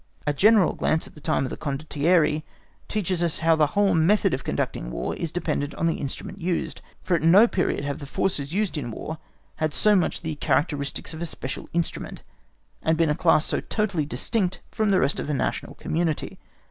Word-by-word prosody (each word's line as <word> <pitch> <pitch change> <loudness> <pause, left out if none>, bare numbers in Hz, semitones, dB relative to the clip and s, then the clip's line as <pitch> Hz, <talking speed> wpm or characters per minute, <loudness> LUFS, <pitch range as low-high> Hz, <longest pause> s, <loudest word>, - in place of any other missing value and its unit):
A 150 - +1
general 205 +3 +5
glance 160 - 0
at - - -13
the 150 - -14
time 155 -2 +1
of 130 - -3
the - - -5
Condottieri 150 +2 +1 0.5
teaches 185 -4 -1
us 170 -3 +1
how 165 0 +3
the 155 -2 +3
whole 205 -1 +4
method 190 +3 +3
of 130 - -2
conducting - - -2
War - - -3
is 165 - -4
dependent 150 -4 -2
on 165 - -1
the 165 - +1
instrument 145 +7 -6
used; 175 0 -2 0.2
for 185 - -1
at 170 - +2
no 185 +8 +7
period 180 -8 -1
have 140 +1 -3
the 140 - -8
forces 145 -2 -1
used 195 -4 0
in 120 -4 -5
War 155 +7 -6 0.4
had 155 -1 -1
so 210 -1 +5
much 180 - +1
the 160 -1 -3
characteristics 145 0 -1
of 160 - -7
a 170 - -2
special 130 -4 -6
instrument, 170 0 -3 0.6
and 160 0 +1
been 165 -2 +3
a - - +1
class 160 -2 +3
so - - +1
totally 195 -9 -1
distinct 185 +3 -1
from 215 -1 0
the 190 -2 +4
rest 140 - +1
of - - -4
the 150 - -1
national - - -2
community. 165 -2 -2
160 Hz, 205 wpm, -25 LUFS, 150-180 Hz, 0.6 s, no